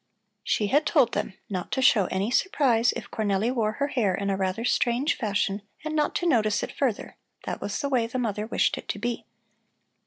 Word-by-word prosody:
She 210 Hz, -, +1 dB
had 290 Hz, +9 st, +2 dB
told 275 Hz, -8 st, +4 dB
them 190 Hz, -, -3 dB
not 185 Hz, -5 st, -4 dB
to 265 Hz, -, 0 dB
show 210 Hz, -6 st, +5 dB
any 195 Hz, +5 st, -1 dB
surprise 245 Hz, -8 st, +3 dB
if -, -, -8 dB
Cornelli 215 Hz, +1 st, 0 dB
wore 220 Hz, -4 st, 0 dB
her 280 Hz, +4 st, -1 dB
hair 210 Hz, -10 st, +1 dB
in 200 Hz, 0 st, -1 dB
a -, -, +1 dB
rather 190 Hz, +4 st, -2 dB
strange 245 Hz, +3 st, +1 dB
fashion 205 Hz, -3 st, -1 dB, 0.2 s
and 310 Hz, 0 st, -2 dB
not 300 Hz, -1 st, +1 dB
to 350 Hz, -, -1 dB
notice 215 Hz, -8 st, +2 dB
it -, -, -4 dB
further; 255 Hz, -7 st, -2 dB, 0.3 s
that -, -, -5 dB
was -, -, -3 dB
the 285 Hz, -, -1 dB
way 245 Hz, -4 st, +1 dB
the 250 Hz, -, -4 dB
mother 215 Hz, -3 st, -2 dB
wished -, -, +1 dB
it -, -, -12 dB
to -, -, -3 dB
be. 235 Hz, +2 st, -3 dB
230 Hz, 210 wpm, -26 LUFS, 205-265 Hz, 0.3 s, show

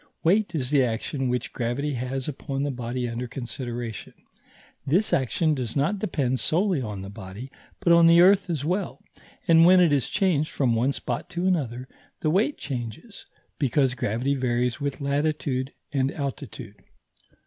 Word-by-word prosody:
Weight 195 Hz, +3 st, +2 dB
is 130 Hz, -3 st, -1 dB
the 140 Hz, -3 st, +4 dB
action 125 Hz, +3 st, -2 dB
which 125 Hz, 0 st, -2 dB
gravity 130 Hz, +5 st, -2 dB
has 130 Hz, +1 st, -3 dB
upon 140 Hz, -1 st, -3 dB
the 145 Hz, -, -1 dB
body 125 Hz, 0 st, -3 dB
under 120 Hz, +1 st, -4 dB
consideration; 120 Hz, -2 st, -6 dB, 0.7 s
this 170 Hz, +10 st, +1 dB
action 140 Hz, +5 st, +2 dB
does 125 Hz, -5 st, -3 dB
not 155 Hz, +9 st, +1 dB
depend 135 Hz, -10 st, -1 dB
solely 180 Hz, -2 st, +1 dB
on 105 Hz, -5 st, -5 dB
the 95 Hz, -, -7 dB
body, 105 Hz, +5 st, -9 dB, 0.3 s
but 170 Hz, -3 st, +4 dB
on 170 Hz, 0 st, +7 dB
the 170 Hz, +1 st, +7 dB
earth 190 Hz, +2 st, +5 dB
as 150 Hz, -5 st, -2 dB
well; 185 Hz, +3 st, -2 dB, 0.4 s
and 165 Hz, 0 st, +7 dB
when 180 Hz, +2 st, +7 dB
it 170 Hz, -4 st, +5 dB
is 140 Hz, -3 st, +1 dB
changed 175 Hz, -6 st, +1 dB
from 130 Hz, -4 st, +1 dB
one 120 Hz, +4 st, +2 dB
spot 125 Hz, +4 st, -4 dB
to 175 Hz, 0 st, -3 dB
another, 130 Hz, -9 st, -1 dB, 0.3 s
the 155 Hz, -, +1 dB
weight 215 Hz, -, +2 dB
changes, 125 Hz, -, -7 dB, 0.3 s
because 135 Hz, -1 st, +2 dB
gravity 125 Hz, +3 st, -1 dB
varies 125 Hz, -1 st, 0 dB
with 140 Hz, +1 st, -3 dB
latitude 140 Hz, -2 st, -1 dB, 0.2 s
and 135 Hz, -1 st, +1 dB
altitude. 130 Hz, -7 st, -6 dB
135 Hz, 160 wpm, -25 LUFS, 125-165 Hz, 0.7 s, on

